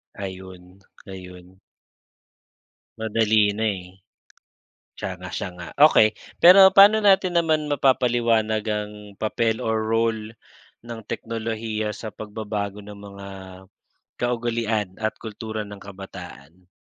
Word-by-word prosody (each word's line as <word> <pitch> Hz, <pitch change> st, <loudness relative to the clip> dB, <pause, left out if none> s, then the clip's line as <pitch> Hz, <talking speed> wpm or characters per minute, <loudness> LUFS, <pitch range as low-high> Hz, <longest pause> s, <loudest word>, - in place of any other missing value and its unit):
Ayun, 95 Hz, -1 st, -9 dB, 0.3 s
ayun. 90 Hz, -1 st, -11 dB, 1.4 s
Madali 110 Hz, -1 st, +2 dB
na 110 Hz, +2 st, -2 dB
eh. 90 Hz, +1 st, -14 dB, 1.0 s
Siya -, -, -4 dB
nga, -, -, -9 dB
siya -, -, -4 dB
nga. 90 Hz, -1 st, -9 dB, 0.2 s
Okey, 110 Hz, -7 st, +4 dB, 0.3 s
pero 190 Hz, +2 st, +9 dB
paano 205 Hz, +2 st, +8 dB
natin 190 Hz, -4 st, +3 dB
naman 155 Hz, -3 st, 0 dB
mapapaliwanag 120 Hz, -5 st, +2 dB
ang 105 Hz, -1 st, -2 dB, 0.2 s
papel 110 Hz, +2 st, -1 dB
or 110 Hz, 0 st, 0 dB
role 110 Hz, 0 st, -1 dB, 0.5 s
ng 120 Hz, -1 st, -7 dB
teknolohiya 110 Hz, -2 st, -4 dB
sa 110 Hz, -, -7 dB
pagbabago 105 Hz, -1 st, -5 dB
ng 105 Hz, 0 st, -10 dB
mga 100 Hz, -1 st, -10 dB, 1.0 s
kaugalian 115 Hz, -4 st, -1 dB
at 110 Hz, -, 0 dB
kultura 110 Hz, -1 st, -6 dB
ng 100 Hz, -1 st, -11 dB
kabataan? 90 Hz, -4 st, -11 dB
110 Hz, 105 wpm, -23 LUFS, 100-115 Hz, 1.4 s, pero